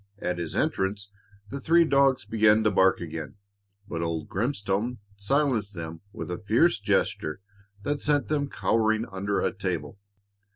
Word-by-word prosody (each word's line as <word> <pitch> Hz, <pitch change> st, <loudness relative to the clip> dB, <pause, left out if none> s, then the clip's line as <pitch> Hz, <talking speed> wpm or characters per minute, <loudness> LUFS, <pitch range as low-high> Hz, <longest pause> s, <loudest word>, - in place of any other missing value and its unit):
At 90 Hz, -3 st, -3 dB
his 85 Hz, -2 st, -4 dB
entrance 100 Hz, +1 st, -1 dB, 0.4 s
the 140 Hz, 0 st, -5 dB
three 170 Hz, +4 st, +5 dB
dogs 140 Hz, -5 st, +3 dB
began 110 Hz, 0 st, +4 dB
to 110 Hz, -, +3 dB
bark 95 Hz, -1 st, +4 dB
again, 80 Hz, -1 st, -6 dB, 0.5 s
but 85 Hz, -4 st, -4 dB
old 85 Hz, -2 st, -2 dB
Grimstone 110 Hz, +1 st, -1 dB, 0.2 s
silenced 110 Hz, -2 st, 0 dB
them 80 Hz, -1 st, -6 dB
with 90 Hz, -, -6 dB
a 90 Hz, -, -4 dB
fierce 115 Hz, +6 st, +3 dB
gesture 85 Hz, -5 st, 0 dB, 0.4 s
that 145 Hz, 0 st, -1 dB
sent 145 Hz, -1 st, +1 dB
them 145 Hz, -2 st, 0 dB
cowering 110 Hz, -2 st, +1 dB
under 100 Hz, +1 st, -1 dB
a -, -, 0 dB
table. 90 Hz, -4 st, -4 dB
105 Hz, 150 wpm, -27 LUFS, 95-130 Hz, 0.5 s, three